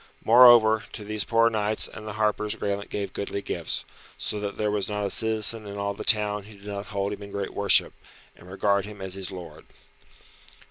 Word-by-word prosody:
Moreover, 115 -2 +7
to 105 - -7
these 105 0 -1
poor 115 0 +3
knights 105 0 +1
and 110 - -10
the 105 - -5
harpers 105 0 0
Graelent 100 0 -3
gave 100 -1 -4
goodly 100 0 -4
gifts, - - -3 0.3
so 105 - -3
that 100 -1 -5
there 105 -1 0
was 105 -1 -1
not 105 -1 -2
a 100 - -3
citizen 110 0 0
in 100 0 -7
all 100 0 -2
the 100 - -7
town 105 -2 +2
who 105 0 -14
did 100 0 -17
not 100 0 -6
hold 100 0 -2
him 105 - -9
in 100 - -9
great 100 -1 -5
worship, 100 -1 +3 0.4
and 90 - -16
regard 100 +1 +1
him 105 0 -10
as 95 -1 -3
his 95 -1 -3
lord. 90 -3 -9
105 Hz, 205 wpm, -25 LUFS, 100-110 Hz, 0.4 s, Moreover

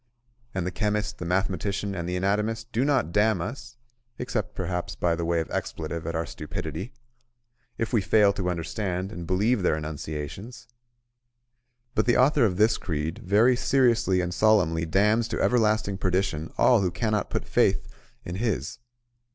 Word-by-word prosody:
And 90 -2 -1
the 90 - -2
chemist, 105 +2 -1
the 90 - -4
mathematician, 95 +2 -1
and 85 -2 -4
the 90 - -2
anatomist 105 +5 -1
do 120 +3 +1
not 135 - +1
damn 105 0 +3
us 120 +5 -6 0.4
(except, 115 -5 -3
perhaps, 90 -1 -3
by 85 -1 +1
way 85 0 0
of 80 - -7
expletive 80 +1 -4
at 85 - -3
our 80 +1 -1
stupidity) 80 - -6 0.9
if 115 +2 -3
we 115 - +4
fail 100 +1 +4
to 95 -2 -2
understand 90 +2 -3
and 85 -5 -7
believe 105 +5 +2
their 90 - +2
enunciations; 80 - -6 1.3
but - - +1
the 120 - +4
author 130 0 +4
of 90 -4 0
this 110 +2 +3
creed 80 -1 -3
very 110 +7 +4
seriously 120 -7 +2
and 90 0 -3
solemnly 90 -6 +3
damns 105 +6 +2
to - - -3
everlasting 110 -4 +2
perdition 90 -4 -1
all 120 -4 +5
who 95 - +1
cannot 105 +3 -1
put - - -2
faith - - +2 0.4
in 90 +1 -5
his. 105 - -2
95 Hz, 160 wpm, -26 LUFS, 85-110 Hz, 1.3 s, all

